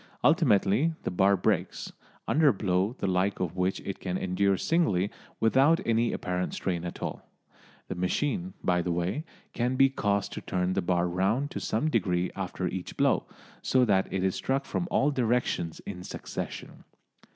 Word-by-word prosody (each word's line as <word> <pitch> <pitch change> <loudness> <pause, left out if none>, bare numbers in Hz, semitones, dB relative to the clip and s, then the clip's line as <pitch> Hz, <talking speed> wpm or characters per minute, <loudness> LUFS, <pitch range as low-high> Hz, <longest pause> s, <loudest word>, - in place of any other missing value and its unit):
Ultimately 110 +11 +3
the - - -2
bar 95 +2 +3
breaks, 90 - -1 0.3
under 150 +7 +4
a 135 - +6
blow 95 +3 0
the - - -3
like 95 +1 +1
of 90 -2 -2
which 95 +1 0
it 100 - -5
can 90 -1 -2
endure 95 +1 +1
singly 105 - +1 0.3
without 135 +8 +4
any 115 0 +2
apparent 90 -1 -2
strain 85 -3 -2
at 85 - -6
all. - - -5 0.6
The - - -3
machine, 145 - -1
by 90 -1 +2
the 90 - -2
way, 90 - -1 0.3
can 125 +2 0
be 135 0 +5
caused 100 -6 0
to - - -5
turn 90 0 -1
the - - +1
bar 90 0 +1
round 100 +11 0
to - - -4
some 115 +8 -1
degree 90 - +1
after - - -3
each - - -5
blow, - - +2 0.3
so 130 -1 +3
that 95 -4 +2
it 95 -1 -1
is 95 -1 +2
struck 135 +1 -1
from 175 - -2
all 145 +2 +2
directions 120 - 0
in 90 -3 -7
succession. - - -6
100 Hz, 175 wpm, -28 LUFS, 90-130 Hz, 0.6 s, a